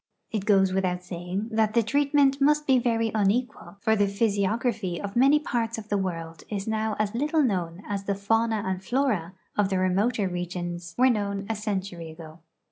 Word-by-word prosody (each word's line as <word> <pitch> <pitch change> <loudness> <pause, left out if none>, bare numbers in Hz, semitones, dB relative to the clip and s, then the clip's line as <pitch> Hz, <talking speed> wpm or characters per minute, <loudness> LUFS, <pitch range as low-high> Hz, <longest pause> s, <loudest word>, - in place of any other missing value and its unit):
It 210 -4 -2
goes 195 -2 +4
without 180 -1 0
saying 180 +4 -4
that 220 0 +1
the 235 - +4
treatment 280 +2 +2
must 300 +1 +3
be 265 -3 +4
very 230 -2 +1
unequal, 215 +1 -1
for 220 0 +3
the 205 -1 +2
physiog 200 +1 0
raphy 205 -8 -1
of 200 0 -6
many 270 +5 +6
parts 230 -6 -2
of 215 -1 -8
the 205 - +1
world 165 -3 -4
is 200 -1 -4
now 220 -1 -1
as 210 0 -1
little 300 +5 +1
known 180 -5 -1
as 200 -1 -3
the 200 - 0
fauna 225 +2 +1
and 190 0 -2
flora 215 -8 0 0.2
of 205 -2 +2
the 190 - 0
remoter 195 +4 +1
regions 175 -1 -5
were 255 +1 +5
known 200 -2 -2
a 225 - -1
century 195 -5 -4
ago. 160 0 -11
205 Hz, 190 wpm, -26 LUFS, 185-230 Hz, 0.2 s, many